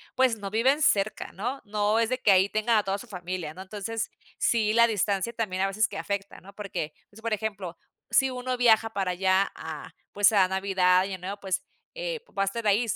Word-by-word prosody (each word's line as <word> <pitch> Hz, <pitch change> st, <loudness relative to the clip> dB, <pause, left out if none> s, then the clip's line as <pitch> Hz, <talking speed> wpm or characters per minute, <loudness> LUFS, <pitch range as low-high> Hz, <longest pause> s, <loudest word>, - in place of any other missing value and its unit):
pues, 255 Hz, -3 st, +3 dB
no 200 Hz, -1 st, -5 dB
viven 260 Hz, +8 st, +2 dB
cerca, 205 Hz, -6 st, +1 dB
¿no? 245 Hz, +8 st, -4 dB
No 210 Hz, +1 st, +1 dB
es 230 Hz, 0 st, +2 dB
de 255 Hz, -, 0 dB
que 205 Hz, -, +4 dB
ahí 190 Hz, +1 st, +5 dB
tenga 215 Hz, +1 st, +2 dB
a 210 Hz, -, +2 dB
toda 195 Hz, 0 st, -1 dB
su 245 Hz, -, -11 dB
familia, 180 Hz, -5 st, -5 dB
¿no? 185 Hz, -, -9 dB
Entonces, 210 Hz, +3 st, -4 dB, 0.3 s
sí 220 Hz, -2 st, +2 dB
la 235 Hz, 0 st, +6 dB
distancia 205 Hz, 0 st, 0 dB
también 200 Hz, -5 st, -2 dB
a 195 Hz, -, +3 dB
veces 205 Hz, +3 st, +1 dB
que -, -, -7 dB
afecta, 200 Hz, -1 st, -4 dB
¿no? 200 Hz, +2 st, -14 dB
Porque, 185 Hz, -7 st, -5 dB, 0.2 s
pues, 215 Hz, +2 st, -16 dB
por 230 Hz, 0 st, -3 dB
ejemplo, 200 Hz, -5 st, -4 dB, 0.3 s
si 265 Hz, -, +4 dB
uno 255 Hz, 0 st, -3 dB
viaja 225 Hz, -2 st, +4 dB
para 195 Hz, -3 st, 0 dB
allá 190 Hz, +2 st, +2 dB
a 160 Hz, -2 st, -8 dB, 0.2 s
pues, 205 Hz, +1 st, +4 dB
a 190 Hz, -3 st, +5 dB
Navidad 190 Hz, -1 st, +3 dB
y 195 Hz, -, -5 dB
Año -, -, -4 dB
Nuevo, 195 Hz, +3 st, -5 dB
pues, 190 Hz, -2 st, -2 dB, 0.3 s
eh, -, -, -3 dB, 0.2 s
va 195 Hz, -, +3 dB
a -, -, +1 dB
estar 215 Hz, +3 st, -3 dB
ahí 210 Hz, +4 st, +3 dB
205 Hz, 220 wpm, -27 LUFS, 190-225 Hz, 0.3 s, la